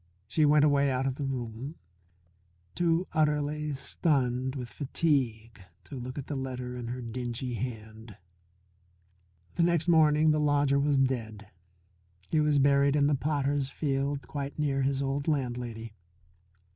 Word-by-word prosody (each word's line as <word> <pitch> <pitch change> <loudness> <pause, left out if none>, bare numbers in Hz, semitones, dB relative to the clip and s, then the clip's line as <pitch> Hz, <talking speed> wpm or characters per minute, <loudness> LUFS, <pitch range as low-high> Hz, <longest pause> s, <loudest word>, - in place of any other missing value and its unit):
She 150 +8 +2
went 150 0 +5
away 140 -1 +3
out 130 0 0
of 135 - 0
the 140 +2 -4
room, 130 +2 -5 1.0
too 170 +1 +1
utterly 150 0 0
stunned 130 -2 0
with 125 -3 -5
fatigue 120 - -1 0.2
to 140 - -10
look 125 +1 -6
at 140 - -4
the 150 - -4
letter 125 -2 -4
in 120 -1 -6
her 125 +1 -5
dingy 120 +1 -4
hand. 110 -3 -7 1.4
The - - +2
next 170 -1 +2
morning 155 -2 +5
the 155 - +2
lodger 145 -1 +2
was 140 0 +2
dead. 115 -6 -1 0.8
He 155 - +3
was 150 -1 +2
buried 140 0 +4
in 145 -1 +3
the 145 - +3
potters' 140 -1 0
field 140 -1 -2
quite 140 -1 -5
near 140 -2 0
his 135 +1 0
old 140 +2 -2
landlady. 120 -6 -2
140 Hz, 145 wpm, -29 LUFS, 125-150 Hz, 1.4 s, went